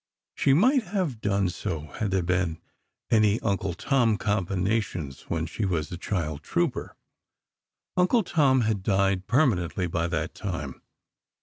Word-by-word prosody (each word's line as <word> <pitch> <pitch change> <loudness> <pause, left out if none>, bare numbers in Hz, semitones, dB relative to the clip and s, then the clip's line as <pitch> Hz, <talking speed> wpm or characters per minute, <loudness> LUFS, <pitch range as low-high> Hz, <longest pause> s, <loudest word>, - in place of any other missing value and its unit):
She 135 - +3
might 255 - +4
have 175 - -2
done 100 -2 +1
so, 90 -3 -4 0.2
had 110 - 0
there 95 -2 +1
been 90 -2 0 0.5
any 110 -1 +4
"Uncle 100 -4 -1
Tom" 120 -2 +2
combinations 95 -6 -1
when 80 -1 -1
she 85 +7 -4
was 85 -6 -1
a - - -3
child 80 -5 -3
trouper. 170 - -1 1.0
"Uncle 185 +6 +3
Tom" 140 -7 +3
had 110 -3 0
died 95 -1 +1
permanently, 100 - +2
by 85 -1 -1
that - - -2
time. - - -5
100 Hz, 135 wpm, -26 LUFS, 90-125 Hz, 1.0 s, might